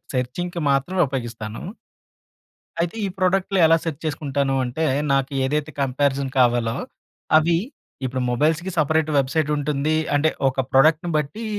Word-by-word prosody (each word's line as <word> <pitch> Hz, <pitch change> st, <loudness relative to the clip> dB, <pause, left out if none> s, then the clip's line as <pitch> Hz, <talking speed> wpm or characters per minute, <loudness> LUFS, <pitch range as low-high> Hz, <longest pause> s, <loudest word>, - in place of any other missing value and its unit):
సెర్చింగ్‌కి 170 Hz, +8 st, -3 dB
మాత్రమే 175 Hz, +7 st, +1 dB
ఉపయోగిస్తాను. 115 Hz, -5 st, -5 dB, 1.2 s
అయితే 175 Hz, +5 st, -2 dB
ఈ -, -, 0 dB
ప్రొడక్ట్‌లు 190 Hz, +1 st, +1 dB
ఎలా 165 Hz, +1 st, +5 dB
సెర్చ్ 160 Hz, -4 st, -4 dB
చేసుకుంటాను 140 Hz, -2 st, -1 dB
అంటే, 145 Hz, +6 st, -2 dB, 0.3 s
నాకు 135 Hz, +1 st, 0 dB
ఏదైతే 150 Hz, +2 st, -1 dB
కంపేరిజన్ 135 Hz, 0 st, 0 dB
కావాలో 120 Hz, -2 st, +2 dB, 0.6 s
అవి 165 Hz, +1 st, +3 dB, 0.5 s
ఇప్పుడు 130 Hz, 0 st, -2 dB
మొబైల్స్‌కి 160 Hz, +8 st, +1 dB
సెపరేట్ 155 Hz, +1 st, +2 dB
వెబ్‌సైట్ 145 Hz, +3 st, +1 dB
ఉంటుంది. 145 Hz, +1 st, 0 dB, 0.2 s
అంటే 150 Hz, +2 st, +3 dB, 0.2 s
ఒక 130 Hz, 0 st, -1 dB
ప్రొడక్ట్‌ని 155 Hz, +5 st, +4 dB
బట్టి 180 Hz, +10 st, -3 dB
145 Hz, 125 wpm, -22 LUFS, 135-160 Hz, 1.2 s, ఎలా